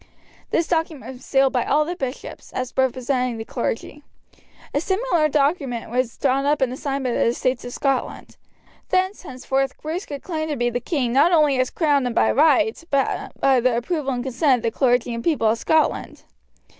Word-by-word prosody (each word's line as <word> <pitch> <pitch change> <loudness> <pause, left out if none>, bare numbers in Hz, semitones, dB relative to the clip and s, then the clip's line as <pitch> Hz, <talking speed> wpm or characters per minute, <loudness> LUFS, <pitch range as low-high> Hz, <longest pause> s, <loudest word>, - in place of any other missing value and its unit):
This 335 - +1
document 320 -5 -2
was 255 0 -14
sealed 270 -1 +2
by 250 - +1
all 300 +1 +2
the 350 +3 -4
bishops, 265 -6 -6
as 255 0 -4
representing 255 -1 0
the 225 - -6
clergy. 245 +4 -4 0.7
A 285 - +1
similar 375 -5 +1
document 280 -6 0
was 245 -1 -1
drawn 270 0 +1
up 290 +1 +2
and 260 -1 -1
signed 275 -1 -2
by 250 - 0
the - - +1
estates 245 +2 0
of 245 - -6
Scotland. 270 0 -2 0.5
Therefore, 375 0 0
henceforth 270 +1 -2
Bruce 325 +5 -4
could 285 -2 -7
claim 315 -3 -3
to 295 - -1
be 240 -2 0
the 245 - -1
king 250 -2 -1
not 285 +7 +5
only 300 -6 +4
as 255 - +1
crowned 290 -5 +1
and 235 - -4
by 110 0 +3
right, 250 - +3
but 275 -1 -1
by 265 -2 +4
the 240 -1 +2
approval 275 +2 -2
and 245 -1 -3
consent 260 0 +2
of - - -20
the 230 - 0
clergy 245 -2 +2
and 230 0 -5
people 300 -9 +1
of 225 +1 0
Scotland. 315 -1 0
270 Hz, 195 wpm, -22 LUFS, 245-300 Hz, 0.7 s, not